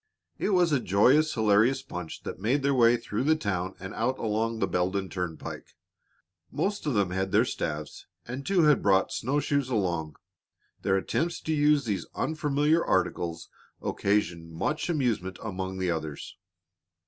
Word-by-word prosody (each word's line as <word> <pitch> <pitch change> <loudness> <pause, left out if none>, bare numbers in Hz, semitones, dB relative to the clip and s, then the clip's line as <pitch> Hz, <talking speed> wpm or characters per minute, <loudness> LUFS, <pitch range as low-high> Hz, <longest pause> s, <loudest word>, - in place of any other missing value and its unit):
It - - 0
was 180 -4 +3
a 140 - +3
joyous, 130 - +4
hilarious 110 +4 +3
bunch 90 -3 -7
that - - -6
made 125 +8 +1
their 140 0 +3
way 120 -2 +5
through 115 0 -3
the 155 +3 +4
town 95 - -2
and 95 - -7
out 125 +4 -1
along 110 +1 -1
the - - +1
Beldon 95 +2 -1
Turnpike. 90 -4 -6 0.8
Most 195 +4 -2
of 140 - 0
them 100 -3 +1
had 95 +1 -1
their - - +4
staves, 75 0 -4 0.2
and 130 +3 -5
two 185 +1 +2
had 150 -1 +5
brought 95 -1 +3
snow 135 +5 0
shoes 140 -2 0
along. 85 -9 -1 0.7
Their 95 - +2
attempts 170 - -1
to 160 - -1
use 150 -2 +3
these 105 -4 -2
unfamiliar 155 +1 +1
articles 85 -2 -1 0.3
occasioned 85 -5 -1
much 150 - -2
amusement 115 - -1
among 95 -2 -4
the 95 -2 0
others. 80 -3 -5
110 Hz, 160 wpm, -28 LUFS, 95-145 Hz, 0.8 s, way